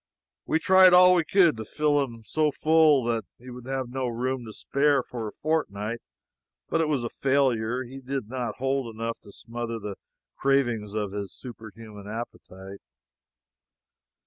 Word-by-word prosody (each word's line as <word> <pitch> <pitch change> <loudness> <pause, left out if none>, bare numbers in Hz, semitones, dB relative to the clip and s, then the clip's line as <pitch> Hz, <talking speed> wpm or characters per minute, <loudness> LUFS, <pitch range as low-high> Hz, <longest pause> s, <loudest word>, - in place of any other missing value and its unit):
We - - +2
tried 185 +2 +6
all 180 0 +8
we 175 -2 +3
could 170 - +4
to 110 - -5
fill 145 +5 +1
him 115 -4 -8
so 155 +7 0
full 155 -3 +4
that 115 -1 -1
he 125 +1 -12
would 125 0 -10
have 135 -2 -3
no 130 0 -2
room 125 +1 -2
to 110 - -8
spare 140 +4 +1
for 115 -3 -6
a - - -6
fortnight, 115 -8 -2 0.7
but 165 - +1
it 160 - +1
was 145 -5 0
a 120 - -2
failure. 130 -3 +1
He 130 +2 -10
did 135 -3 -4
not 125 0 -4
hold 135 -3 -2
enough 115 +1 -4
to 100 - -15
smother 115 +2 -6
the 105 -3 -6 0.4
cravings 120 -7 0
of 105 -2 -2
his 100 -2 -5
superhuman 110 -3 -11
appetite. 100 -3 -8
125 Hz, 165 wpm, -26 LUFS, 110-140 Hz, 0.7 s, all